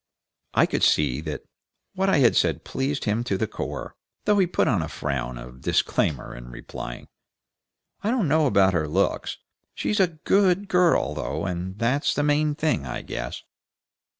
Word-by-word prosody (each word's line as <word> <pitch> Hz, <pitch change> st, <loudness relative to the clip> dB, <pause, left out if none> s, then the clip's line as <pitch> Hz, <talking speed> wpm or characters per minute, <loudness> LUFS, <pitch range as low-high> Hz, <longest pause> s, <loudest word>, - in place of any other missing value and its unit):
I -, -, +6 dB
could -, -, -2 dB
see 70 Hz, -2 st, +3 dB
that 80 Hz, -1 st, -5 dB, 0.5 s
what 195 Hz, 0 st, +1 dB
I 195 Hz, -, +4 dB
had 125 Hz, -5 st, +5 dB
said -, -, +2 dB
pleased 135 Hz, +1 st, -2 dB
him 110 Hz, +2 st, +1 dB
to 100 Hz, -5 st, 0 dB
the 110 Hz, -, 0 dB
core, -, -, -5 dB, 0.3 s
though 210 Hz, -1 st, +4 dB
he 185 Hz, -, +4 dB
put 175 Hz, -, +1 dB
on 105 Hz, -9 st, +2 dB
a 80 Hz, -, -3 dB
frown 65 Hz, -5 st, -3 dB
of 60 Hz, +1 st, -11 dB
disclaimer 70 Hz, 0 st, 0 dB
in -, -, -10 dB
replying, -, -, -8 dB, 1.0 s
"I 210 Hz, -, +1 dB
don't 235 Hz, -7 st, +1 dB
know 155 Hz, +1 st, +3 dB
about 95 Hz, -6 st, +4 dB
her 80 Hz, -3 st, 0 dB
looks. 75 Hz, -, 0 dB, 0.4 s
She's 210 Hz, -, -1 dB
a 190 Hz, -, +5 dB
GOOD 185 Hz, +4 st, +2 dB
girl, 180 Hz, -, +3 dB
though, 75 Hz, +3 st, -3 dB
and 90 Hz, +1 st, -4 dB
that's 125 Hz, +6 st, +1 dB
the 145 Hz, -, +1 dB
main 150 Hz, 0 st, +2 dB
thing, 150 Hz, -, 0 dB
I 65 Hz, -, -5 dB
guess." -, -, -5 dB
115 Hz, 175 wpm, -25 LUFS, -, 1.0 s, I